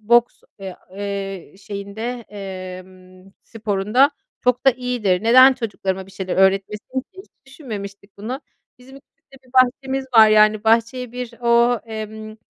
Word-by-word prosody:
boks, 235 +2 +2 0.2
eee, 190 -2 -8 0.2
eee, 195 -2 -5
şeyinde, 210 +5 -6
emm, 185 -1 -10
sporunda 220 +4 +1 0.3
çok 250 +1 +1
da - - +9
iyidir. 240 -7 -1
Neden 255 +4 +7
çocuklarıma 195 -6 -4
bir - - -16
şeyler 185 -1 -4
öğretmesin 195 +6 +1
ki? - - -22
Hiç 380 - -11 0.2
düşünmemiştik 200 -8 -9
bunu. 245 +7 -5 0.4
Bizim 260 +2 -15
ülkemizde 275 0 -21
bir 250 - -24
bahçemiz 265 +1 +2
var, 220 -1 +8
yani, 215 0 +4
bahçeye 230 +2 +1
bir 250 -1 -6
o, 235 0 +3
emm, 220 0 -7
220 Hz, 135 wpm, -20 LUFS, 195-250 Hz, 0.4 s, da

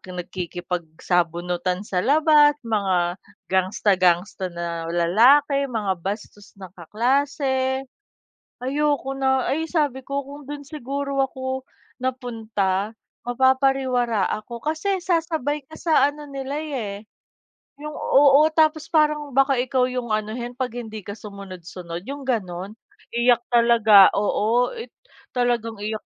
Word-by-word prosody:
nakikipagsabunutan 175 +1 -2
sa 190 -4 -2
labas, 295 - +5
mga 190 -5 0 0.3
gangster-gangster 185 0 +2
na 170 -1 -5
lalaki, 255 - +4
mga 205 -7 -2
bastos 205 +2 -7
na 190 -3 -11
kaklase. 265 - 0 0.8
Ayoko 275 0 -1
na, 265 -1 +1
ay, 320 +4 0
sabi 290 -6 -1
ko 280 0 -2
kung 285 +1 -11
doon 290 +1 -7
siguro 280 -1 -4
ako 260 0 -5 0.3
napunta 225 -6 -2 0.3
mapapariwara 260 -3 +2
ako 235 +2 -9
kasi 330 - -1
sasabay 320 -5 -1
ka 315 +4 -13
sa 310 -3 +3
ano 295 0 -11
nila 275 +1 -4
eh 220 -9 -5 0.7
yung 300 - -5
oo, 285 +2 +5
tapos 315 0 +2
parang 300 -3 +2
baka 270 0 +3
ikaw 255 0 +1
yung 245 -3 -3
anuhin 220 +3 -3
'pag 255 0 -3
hindi 220 -3 -6
ka 205 +3 -8
sumunod-sunod 185 -3 -9
yung 280 +1 -6
gano'n. 205 -5 -3 0.4
Iyak 240 0 +4
talaga, 230 -4 +6
oo, 220 +4 +1
i 460 - -5 0.5
talagang 235 -3 -1
iyak, 215 +1 -4
245 Hz, 115 wpm, -23 LUFS, 200-280 Hz, 0.8 s, talaga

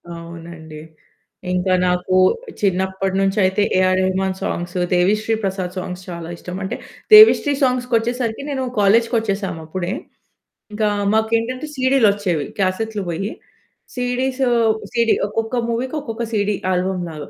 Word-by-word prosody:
అవునండి. 165 -2 -10 0.7
ఇంకా 180 +1 +1
నాకు 180 +1 0 0.5
చిన్నప్పటి 190 0 0
నుంచి 195 +2 0
అయితే, 190 +2 +1 0.2
AR 185 0 +3
Rahman 190 0 0
songs 175 +1 -3 0.2
Devi Sri 210 +5 +2
Prasad 190 -1 -3
songs 180 0 -5
చాలా 170 -1 -6
ఇష్టం. 180 +1 -8
అంటే 190 - -3 0.4
దేవిశ్రీ 425 -9 +8
సాంగ్స్‌కి 250 -1 0
వచ్చేసరికి 235 +1 -2
నేను 265 -2 -2 0.2
కాలేజుకొచ్చేసాం 205 -3 +1
అప్పుడే. 175 +2 -4 0.8
ఇంకా 215 0 0 0.3
మాకు 220 0 +2
ఏంటంటే 255 +5 -4
సీడీలొచ్చేవి. 205 - +2
క్యాసెట్లు 205 +2 -1
పోయి 195 +5 -3 0.6
సీడీస్. 255 +1 -1 0.5
సీడీ 235 -1 +3
ఒక్కొక్క 225 +3 -3
మూవీకి 250 +5 -2
ఒక్కొక్క 235 -3 -5
సీడీ. 205 -1 +1 0.2
ఆల్బమ్ 180 0 -1
లాగా. 150 -2 -8
195 Hz, 120 wpm, -20 LUFS, 180-230 Hz, 0.8 s, దేవిశ్రీ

